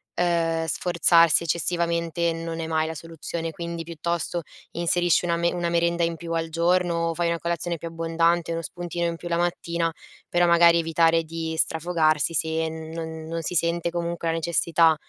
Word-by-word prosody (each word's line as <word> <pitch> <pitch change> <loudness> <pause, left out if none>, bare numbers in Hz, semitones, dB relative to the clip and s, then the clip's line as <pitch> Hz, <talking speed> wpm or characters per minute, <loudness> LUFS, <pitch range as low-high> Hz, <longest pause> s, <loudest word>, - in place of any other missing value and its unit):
uhm, 165 -2 +1
sforzarsi 170 -1 +4
eccessivamente 170 0 +1
non 165 0 -5
è 160 - -4
mai 160 0 0
la 160 - -5
soluzione. 165 +1 -5
Quindi, 170 +1 -5
piuttosto, 170 +1 -3 0.3
inserisci 175 0 +1
una 170 -1 +1
me 170 0 +1
una 175 -1 -2
merenda 170 0 +1
in 165 - -2
più 165 +1 -8
al 165 0 -1
giorno, 170 0 +1
o - - -1
fai 170 +1 -1
una 170 0 0
colazione 170 0 -2
più 165 +1 -7
abbondante, 165 +1 0
uno 165 - -2
spuntino 175 0 -4
in 170 0 -3
più 175 - -8
la 170 - 0
mattina, 170 -1 -1 0.4
però 175 0 +3
magari 170 0 +6
evitare 165 0 +2
di 160 0 -4
strafogarsi, 160 -1 +1
se 160 0 0
non 160 0 -7
non 165 0 -3
si 175 - -3
sente 170 +1 +1
comunque 170 -1 -3
la - - +1
necessità, 165 -1 +3
170 Hz, 175 wpm, -24 LUFS, 165-170 Hz, 0.4 s, magari